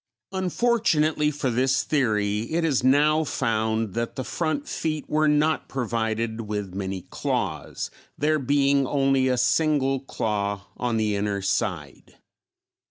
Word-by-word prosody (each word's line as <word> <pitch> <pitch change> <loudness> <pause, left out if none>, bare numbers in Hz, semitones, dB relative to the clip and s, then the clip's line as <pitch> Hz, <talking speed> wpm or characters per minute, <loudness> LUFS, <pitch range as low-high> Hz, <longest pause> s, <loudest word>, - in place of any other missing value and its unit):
Unfortunately 185 -6 +1
for 145 -3 -2
this 130 +3 +2
theory, 110 -5 0
it 165 +1 +1
is 140 -6 +1
now 150 +4 +4
found 110 -5 -1
that 115 0 -3
the 130 - -3
front 170 - -2
feet 155 -2 -3
were 155 0 +2
not 150 +1 +2
provided 115 -2 -2
with 105 -3 -4
many 95 -1 -4
claws, - - -3 0.3
there 155 +1 +2
being 140 0 +2
only 135 -1 +2
a 125 -1 +1
single 140 -1 +2
claw 100 -6 -2
on 120 -2 -1
the 105 -2 +1
inner 100 -1 -1
side. 85 -7 -3
130 Hz, 130 wpm, -25 LUFS, 110-150 Hz, 0.3 s, now